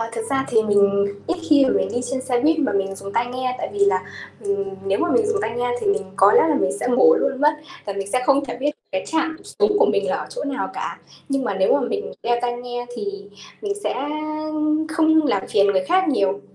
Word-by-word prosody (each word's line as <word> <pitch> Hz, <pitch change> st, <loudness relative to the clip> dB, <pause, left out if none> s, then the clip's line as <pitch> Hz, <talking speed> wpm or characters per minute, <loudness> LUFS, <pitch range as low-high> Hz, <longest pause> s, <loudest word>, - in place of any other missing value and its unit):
Ờ, 225 Hz, 0 st, -3 dB
thực 230 Hz, -1 st, -3 dB
ra 270 Hz, 0 st, +1 dB
thì 220 Hz, -2 st, +3 dB
mình 200 Hz, -1 st, +3 dB, 0.2 s
ít 350 Hz, -, -1 dB
khi 285 Hz, -2 st, +6 dB
mà 260 Hz, -, +2 dB
mình -, -, +1 dB
đi 245 Hz, -, -1 dB
trên 265 Hz, -, -2 dB
xe 250 Hz, -2 st, 0 dB
buýt 320 Hz, +3 st, +3 dB
mà 280 Hz, -6 st, +1 dB
mình 195 Hz, -1 st, -1 dB
dùng 195 Hz, +1 st, -8 dB
tai 240 Hz, +3 st, +1 dB
nghe, 255 Hz, 0 st, -3 dB
tại -, -, -4 dB
vì 410 Hz, -, -6 dB
là, 400 Hz, -, +2 dB, 0.4 s
ừm, 200 Hz, 0 st, -1 dB, 0.2 s
nếu 195 Hz, +1 st, 0 dB
mà 345 Hz, -, 0 dB
mình 445 Hz, -2 st, +3 dB
dùng 445 Hz, -, 0 dB
tai 230 Hz, -, -3 dB
nghe 245 Hz, 0 st, 0 dB
thì -, -, -3 dB
mình 405 Hz, +1 st, +2 dB
có -, -, +6 dB
lẽ 470 Hz, -, +6 dB
là 305 Hz, -, +2 dB
mình 190 Hz, -9 st, +1 dB
sẽ -, -, -2 dB
ngủ 265 Hz, -, +6 dB
luôn 270 Hz, -, -1 dB
mất 300 Hz, +1 st, +5 dB, 0.3 s
và 200 Hz, -, -3 dB
mình 195 Hz, 0 st, -5 dB
sẽ 255 Hz, -, +1 dB
không 280 Hz, 0 st, +3 dB
thể 240 Hz, -, -6 dB
biết 290 Hz, -, +1 dB, 0.2 s
cái 190 Hz, -, -2 dB
trạm 320 Hz, 0 st, -1 dB
xuống 420 Hz, -1 st, +1 dB
của 470 Hz, -, +5 dB
mình -, -, 0 dB
là -, -, +1 dB
ở -, -, -5 dB
chỗ -, -, -5 dB
nào 280 Hz, -1 st, -3 dB
cả. -, -, -5 dB, 0.3 s
Nhưng 275 Hz, -1 st, -1 dB
mà 200 Hz, -, -1 dB
nếu 190 Hz, 0 st, +2 dB
mà 285 Hz, -, +2 dB
mình 425 Hz, -, -4 dB
đeo 240 Hz, 0 st, +1 dB
tai 240 Hz, 0 st, -1 dB
nghe 245 Hz, 0 st, -6 dB
thì 220 Hz, -, -4 dB, 0.6 s
mình 410 Hz, -1 st, -1 dB
sẽ -, -, 0 dB, 1.0 s
không 315 Hz, 0 st, +4 dB
làm 200 Hz, -7 st, 0 dB
phiền 200 Hz, -1 st, +3 dB
người 190 Hz, -2 st, +2 dB
khác 370 Hz, -, +2 dB
nhiều. 200 Hz, -8 st, +1 dB
255 Hz, 260 wpm, -21 LUFS, 205-315 Hz, 1.0 s, khi